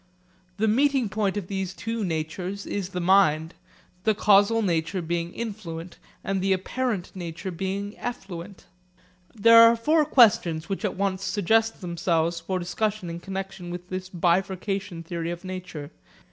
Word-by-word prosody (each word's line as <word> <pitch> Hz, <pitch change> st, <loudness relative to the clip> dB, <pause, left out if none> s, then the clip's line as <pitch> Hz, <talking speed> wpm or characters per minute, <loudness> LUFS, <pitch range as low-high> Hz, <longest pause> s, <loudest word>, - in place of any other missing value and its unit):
The 220 Hz, -, +1 dB
meeting 265 Hz, +1 st, +2 dB
point 205 Hz, 0 st, -1 dB
of 200 Hz, -, -3 dB
these 190 Hz, 0 st, -4 dB
two 225 Hz, +1 st, -3 dB
natures 180 Hz, +3 st, -3 dB
is 195 Hz, -3 st, -3 dB
the 180 Hz, -, -4 dB
mind, 170 Hz, -3 st, +3 dB, 0.5 s
the 220 Hz, -1 st, +3 dB
causal 210 Hz, +2 st, +4 dB
nature 170 Hz, 0 st, 0 dB
being 170 Hz, 0 st, -2 dB
influent 185 Hz, -7 st, -6 dB, 0.2 s
and 195 Hz, -1 st, -1 dB
the 195 Hz, 0 st, +2 dB
apparent 200 Hz, 0 st, -2 dB
nature 175 Hz, +1 st, -5 dB
being 195 Hz, +3 st, -4 dB
effluent. 190 Hz, -5 st, -7 dB, 0.7 s
There 230 Hz, +2 st, +8 dB
are 230 Hz, 0 st, +8 dB
four 305 Hz, +7 st, +3 dB
questions 220 Hz, -, +4 dB
which 195 Hz, +2 st, -3 dB
at 205 Hz, -, -1 dB
once 195 Hz, -1 st, -1 dB
suggest 220 Hz, +3 st, +1 dB
themselves 170 Hz, -1 st, 0 dB
for 185 Hz, +3 st, -3 dB
discussion 185 Hz, +1 st, -2 dB
in 170 Hz, -, -6 dB
connexion 190 Hz, -1 st, -6 dB
with 175 Hz, +1 st, -7 dB
this 185 Hz, 0 st, -5 dB
bifurcation 185 Hz, +1 st, -1 dB
theory 165 Hz, 0 st, -4 dB
of 175 Hz, +1 st, -5 dB
nature. 185 Hz, -5 st, -7 dB
190 Hz, 145 wpm, -25 LUFS, 175-210 Hz, 0.7 s, There